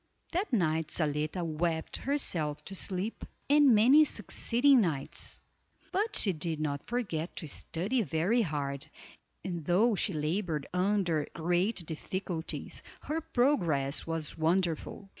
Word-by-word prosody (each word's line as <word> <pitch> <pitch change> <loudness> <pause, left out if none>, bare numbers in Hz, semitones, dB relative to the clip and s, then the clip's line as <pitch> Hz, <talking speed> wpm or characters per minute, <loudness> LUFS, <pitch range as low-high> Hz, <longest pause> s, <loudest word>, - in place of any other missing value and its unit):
That 370 +5 -1
night 160 - +1
Zaletta 155 +3 -1
wept 160 0 -1
herself 170 - -1
to 195 - -6
sleep, 190 +4 -2 0.2
and 285 -4 +6
many 260 +9 +7
succeeding 265 -2 +3
nights; 150 -8 -2 0.5
but 420 +3 0
she 195 - +4
did 160 0 -2
not 145 -2 -3
forget 190 -9 -2
to 160 - -5
study 195 - -2
very 195 +6 +1
hard, 145 -5 -3 0.6
and 175 -3 -3
though 200 +9 +3
she 195 0 0
labored 155 -1 -1
under 180 -5 +1
great 175 +3 0
difficulties, 165 +1 -4 0.2
her 320 +2 -2
progress 170 - +1
was 165 -2 -3
wonderful. 170 +3 0
175 Hz, 120 wpm, -30 LUFS, 155-225 Hz, 0.6 s, many